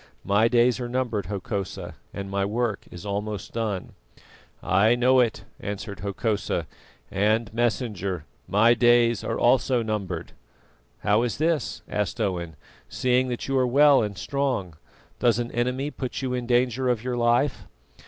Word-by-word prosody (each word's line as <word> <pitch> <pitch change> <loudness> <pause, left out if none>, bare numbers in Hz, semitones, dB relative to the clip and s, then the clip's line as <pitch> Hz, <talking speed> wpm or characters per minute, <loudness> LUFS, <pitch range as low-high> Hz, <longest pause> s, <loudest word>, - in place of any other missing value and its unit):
My 105 +3 +4
days 120 +1 +3
are 120 -1 -4
numbered, 120 -5 -1
Hokosa, 100 -1 -4 0.2
and 100 0 -6
my 100 0 -1
work 110 +1 -1
is 90 +1 -10
almost 105 -1 -4
done." 110 -5 -3 0.7
"I 110 +5 +4
know 130 +2 +4
it," 120 -4 +1 0.2
answered 100 0 -5
Hokosa. 105 +2 -1 0.5
"And, 105 +2 +1
Messenger, 105 - -1 0.2
my 105 +6 +5
days 120 0 +4
are - - -2
also 125 0 +3
numbered." 100 -6 -3 0.7
"How 105 +2 +3
is 120 -2 -1
this?" 160 0 -1
asked 105 +3 -2
Owen, 90 -6 -2 0.3
"seeing 130 0 +1
that 120 -1 -4
you 135 - -1
are 130 - +2
well 140 +2 +6
and 105 -2 -3
strong. 130 - -2 0.4
Does 120 -2 +3
an 120 0 -3
enemy 125 +4 -1
put 130 -1 -5
you 130 -1 -1
in 125 -1 -3
danger 125 +1 +2
of 120 -3 0
your 125 -1 -2
life?" 120 +3 +1
115 Hz, 150 wpm, -25 LUFS, 100-125 Hz, 0.7 s, well